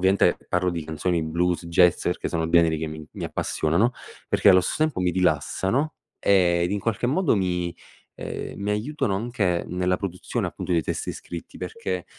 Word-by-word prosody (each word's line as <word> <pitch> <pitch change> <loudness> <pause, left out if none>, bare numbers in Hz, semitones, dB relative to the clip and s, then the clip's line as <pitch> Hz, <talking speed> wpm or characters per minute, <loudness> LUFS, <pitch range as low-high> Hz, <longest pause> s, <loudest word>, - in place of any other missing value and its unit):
ovviamente 95 +2 +4
parlo 90 0 +1
di 85 -3 -4
canzoni 80 +2 -1
blues, 85 +2 0
jazz 85 0 +4
perché 90 - -1
sono 80 -1 -1
generi 80 -2 +4
che 80 - -3
mi 80 0 -7
mi - - -6
appassionano, 90 +11 +1 0.4
perché - - +4
allo 95 -1 +7
stesso 155 - -1
tempo 155 -11 -1
mi 90 -1 +2
rilassano 95 - +1 0.3
ed 90 -2 +3
in 100 - 0
qualche 115 +3 -1
modo 160 -1 +2
mi, 90 -2 -1 0.4
uhm, - - -5
mi 100 +1 -3
aiutano 105 -1 -1
anche 100 -6 0
nella 90 0 0
produzione 90 -2 -3
appunto - - -4
dei 85 - +3
testi - - -3
scritti 85 - -8
perché, 460 +1 -4
90 Hz, 170 wpm, -25 LUFS, 85-100 Hz, 0.4 s, allo